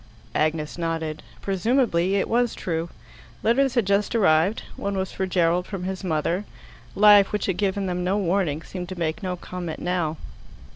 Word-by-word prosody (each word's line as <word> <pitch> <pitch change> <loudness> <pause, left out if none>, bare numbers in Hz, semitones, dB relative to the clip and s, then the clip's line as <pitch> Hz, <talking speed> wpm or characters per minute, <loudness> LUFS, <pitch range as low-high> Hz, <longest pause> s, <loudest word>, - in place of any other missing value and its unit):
Agnes 155 +1 -1
nodded. 165 -2 -2 0.2
Presumably 195 -2 +1
it 195 - +1
was 240 0 +1
true. 165 -1 -3 0.5
Letters 265 +3 +3
had 240 -4 +3
just 200 +4 +1
arrived: 185 -1 +3
one 200 -1 -3
was 190 0 -2
for 190 - -2
Gerald 175 -1 +1
from 195 -3 -5
his 190 +1 -4
mother. 170 +2 0 0.5
Life, 205 -1 +7
which 210 - -1
had 190 -3 -1
given 200 -1 0
them 180 -1 -2
no 190 +3 +1
warning, 175 -5 0
seemed 180 0 -7
to 185 - -6
make 165 +4 -1
no 185 -2 -2
comment 175 -2 -6
now. 175 -3 -1
185 Hz, 165 wpm, -24 LUFS, 165-200 Hz, 0.5 s, Life